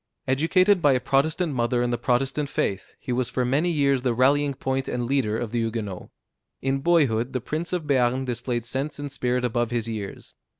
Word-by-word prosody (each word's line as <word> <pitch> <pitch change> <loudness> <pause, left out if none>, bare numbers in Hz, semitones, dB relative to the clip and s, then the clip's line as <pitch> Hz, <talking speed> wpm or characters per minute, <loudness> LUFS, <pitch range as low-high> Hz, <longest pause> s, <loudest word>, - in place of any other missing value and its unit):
Educated 180 +8 +3
by 145 -3 +5
a 130 - +2
Protestant 150 +5 +1
mother 120 0 +1
in 120 - 0
the 120 - 0
Protestant 135 +4 0
faith, 95 -7 -2
he - - -5
was 125 0 0
for 125 - -1
many 145 +8 +1
years 140 -5 +2
the 125 -2 0
rallying 140 +3 +3
point 135 0 -2
and 120 -1 -2
leader 120 -4 0
of 115 -2 -4
the 120 - 0
Huguenots. 110 -5 -3 0.5
In 135 +1 0
boyhood 135 -7 +2
the 130 - 0
prince 155 +8 -3
of 180 -3 -1
Béarn 130 -2 +1
displayed 120 -1 -3
sense 135 +5 -3
and 145 -1 -5
spirit 125 -2 0
above 120 -1 0
his 120 -2 -2
years. 105 -3 -6
130 Hz, 200 wpm, -25 LUFS, 120-145 Hz, 0.5 s, by